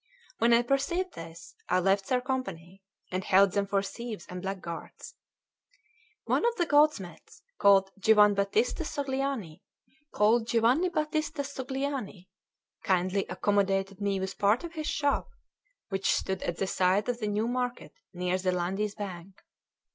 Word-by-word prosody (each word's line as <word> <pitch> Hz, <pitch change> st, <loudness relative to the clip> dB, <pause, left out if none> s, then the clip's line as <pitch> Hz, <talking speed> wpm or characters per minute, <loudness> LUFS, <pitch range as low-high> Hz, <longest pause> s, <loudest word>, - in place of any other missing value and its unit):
When 230 Hz, +1 st, +4 dB
I 235 Hz, +1 st, +5 dB
perceived 280 Hz, +9 st, 0 dB
this, 165 Hz, +1 st, -10 dB, 0.2 s
I 180 Hz, -, +3 dB
left 195 Hz, +1 st, +1 dB
their 250 Hz, -1 st, +2 dB
company, 195 Hz, -9 st, -5 dB, 0.3 s
and 185 Hz, +1 st, -2 dB
held 195 Hz, +1 st, +5 dB
them 200 Hz, +1 st, 0 dB
for 195 Hz, 0 st, +1 dB
thieves 230 Hz, +2 st, -6 dB
and 180 Hz, -2 st, -7 dB
black 195 Hz, 0 st, -4 dB
guards. 170 Hz, -2 st, -8 dB, 1.1 s
One -, -, +1 dB
of 475 Hz, 0 st, +2 dB
the 350 Hz, -, +1 dB
goldsmiths, 290 Hz, -, +1 dB, 0.2 s
called 195 Hz, -1 st, +5 dB
Giovanbattista 210 Hz, -, +3 dB, 2.6 s
Sogliani, 265 Hz, -8 st, -4 dB, 0.5 s
kindly 185 Hz, +1 st, +1 dB
accommodated 195 Hz, 0 st, 0 dB
me 200 Hz, -1 st, 0 dB
with 190 Hz, 0 st, -5 dB
part 205 Hz, +7 st, +3 dB
of 340 Hz, -1 st, -7 dB
his 310 Hz, -2 st, -4 dB
shop, 285 Hz, -1 st, 0 dB, 0.6 s
which 195 Hz, -1 st, 0 dB
stood 190 Hz, -1 st, -2 dB
at 175 Hz, -, -3 dB
the 195 Hz, -, 0 dB
side 190 Hz, +2 st, +1 dB
of 245 Hz, -1 st, -2 dB
the 215 Hz, -, -2 dB
New 210 Hz, +2 st, 0 dB
Market 245 Hz, 0 st, -3 dB, 0.2 s
near 180 Hz, +1 st, -1 dB
the 185 Hz, 0 st, 0 dB
Landi's 190 Hz, +4 st, -2 dB
bank. 190 Hz, -2 st, -8 dB
200 Hz, 130 wpm, -29 LUFS, 190-245 Hz, 2.6 s, I